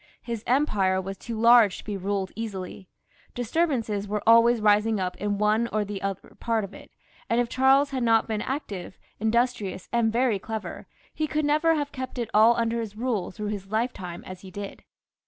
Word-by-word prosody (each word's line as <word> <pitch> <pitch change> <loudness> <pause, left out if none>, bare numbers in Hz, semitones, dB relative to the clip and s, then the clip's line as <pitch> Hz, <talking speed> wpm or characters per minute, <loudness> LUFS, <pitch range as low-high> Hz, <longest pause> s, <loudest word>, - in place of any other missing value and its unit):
His 230 -2 -5
empire 210 -9 +2
was 195 +1 -5
too 225 +3 -6
large 230 -4 +6
to - - -10
be 210 - -4
ruled 195 0 -2
easily, 195 -4 -6 0.5
disturbances 240 -6 -1
were 210 +1 -2
always 230 +1 +6
rising 210 0 +3
up 180 -1 -2
in 205 -1 -1
one 215 +3 +2
or 215 -2 -1
another 195 -1 -5
part 230 -2 0
of 195 - -7
it, - - -13 0.4
and 230 - +2
if 240 -1 0
Charles 270 +3 +4
had 260 -2 -2
not 225 -1 +3
been 215 -2 -2
active, 210 -10 -5 0.2
industrious, 220 -4 0
and 235 -2 +2
very 235 -3 +1
clever, 220 +2 -6 0.3
he 310 - -1
could 305 0 -1
never 310 +3 +3
have 290 -1 -2
kept 260 0 -6
it 235 -2 -3
all 220 +3 +6
imder 230 0 0
his 215 -2 -6
rule 230 -5 -1
through 210 +2 -5
his 200 -2 -5
lifetime 210 -5 -3
as 185 0 -9
he 190 - -11
did. 200 +1 -8
220 Hz, 190 wpm, -26 LUFS, 200-240 Hz, 0.5 s, large